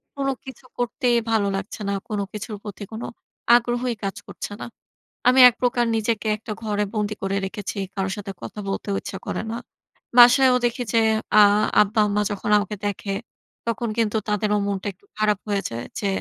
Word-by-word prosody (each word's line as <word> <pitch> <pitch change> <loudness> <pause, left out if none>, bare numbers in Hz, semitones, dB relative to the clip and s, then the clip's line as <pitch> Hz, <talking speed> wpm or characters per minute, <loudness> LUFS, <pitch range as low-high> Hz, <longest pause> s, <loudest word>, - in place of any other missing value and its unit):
কোনো 275 -1 0
কিছু 265 0 -10
করতেই 245 0 +1
ভালো 215 -3 +2
লাগছে 195 +2 -5
না। 200 - 0 0.2
কোনো 205 -2 -1
কিছুর 210 +1 -5
প্রতি 205 0 -7
কোনো 220 - -5 0.5
আগ্রহই 240 0 +1
কাজ 195 -1 -2
করছে - - -7
না। - - -4 0.6
আমি 255 +1 +6
এক 240 - 0
প্রকার 245 -1 +2
নিজেকে 220 0 -1
একটা 215 +1 -7
ঘরে 210 -1 0
বন্দি 210 -1 -1
করে 195 0 -1
রেখেছি। 200 +1 -5 0.2
কারো 190 -1 -1
সাথে 200 -1 -6
কথা - - -8
বলতেও 195 +1 -2
ইচ্ছা 190 - -6
করে - - -2
না। 230 - -3 0.6
বাসায়ও 250 +1 +8
দেখি 240 +1 0
যে 230 - +4 0.4
আ - - +10 0.4
আব্বা-আম্মা 210 0 +1
যখন 205 +1 -3
আমাকে 205 +1 -3
দেখে, 200 0 -3 0.5
তখন 230 0 -1
কিন্তু 220 -1 +1
তাদেরও 210 0 +1
মনটা 200 0 -3
একটু 185 - -32
খারাপ 210 -2 +2
হয়ে 200 -1 0
যায়, 115 +1 -5 0.2
যে 200 - -2
210 Hz, 175 wpm, -23 LUFS, 200-235 Hz, 0.6 s, আ